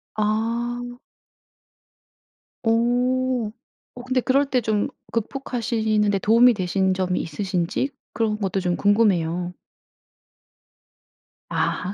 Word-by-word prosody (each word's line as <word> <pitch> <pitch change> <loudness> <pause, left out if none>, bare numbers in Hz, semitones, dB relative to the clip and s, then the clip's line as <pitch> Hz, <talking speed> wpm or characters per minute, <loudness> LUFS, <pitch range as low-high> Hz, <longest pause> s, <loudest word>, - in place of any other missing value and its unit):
아. 235 +3 -1 1.6
어. 245 0 +1 0.4
어 245 - -8
근데 255 0 0
그럴 275 +3 +3
때 255 -2 +2
좀 215 -2 0 0.2
극복하시는 225 -3 0
데 200 - +2
도움이 235 +5 +5
되신 190 0 +1
점이 185 -1 0
있으신지 180 - -2 0.2
그런 220 -1 0
것도 195 -2 -1
좀 180 -2 0
궁금해요. 180 -5 +2 2.0
아. 185 +2 -1
220 Hz, 180 characters per minute, -23 LUFS, 190-245 Hz, 2.0 s, 도움이